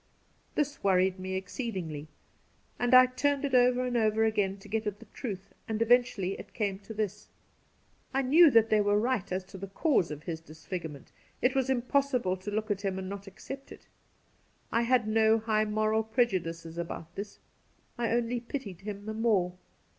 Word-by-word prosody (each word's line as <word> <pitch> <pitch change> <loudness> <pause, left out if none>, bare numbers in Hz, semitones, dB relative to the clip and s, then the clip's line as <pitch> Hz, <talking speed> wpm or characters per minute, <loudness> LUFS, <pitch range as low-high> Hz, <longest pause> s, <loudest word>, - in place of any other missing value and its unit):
This 290 -1 -1
worried 190 -1 +3
me 190 0 -4
exceedingly 185 - -4 0.7
and 245 +1 +4
I 255 0 +10
turned 280 +3 0
it 275 - -3
over 250 0 +4
and 250 -1 -2
over 220 -1 +3
again 200 -3 +1
to 195 - -14
get 220 +1 -2
at 205 -1 -2
the 230 - -14
truth, 205 -3 -7
and 220 -1 -2
eventually 230 -5 +3
it 200 - -11
came 200 -3 -1
to 210 +2 -9
this. 210 -1 -3 0.8
I 270 +1 +1
knew 315 +6 +7
that 225 -3 +4
they 215 -1 +5
were 205 0 +3
right 235 -4 -1
as 185 +1 -1
to 190 +1 -11
the 195 - -5
cause 195 - +1
of 150 0 -7
his 165 -2 -5
disfigurement; 160 -2 -7 0.3
it 255 - +2
was 265 -1 +1
impossible 250 -5 +1
to 185 +3 -6
look 215 +1 -2
at 200 -1 -1
him 195 -2 -2
and 190 0 -4
not 200 0 -7
accept 270 +7 -9
it. - - -12 0.9
I 230 - +2
had 235 -2 +2
no 220 0 +4
high 215 -1 +1
moral 215 +1 +1
prejudices 175 -8 -1
about 170 0 -6
this. 200 +2 -7 0.6
I 235 -1 -1
only 240 +1 0
pitied 235 -7 -6
him 205 0 -6
the 220 - -4
more. 215 -6 +2
215 Hz, 185 wpm, -30 LUFS, 190-245 Hz, 0.9 s, I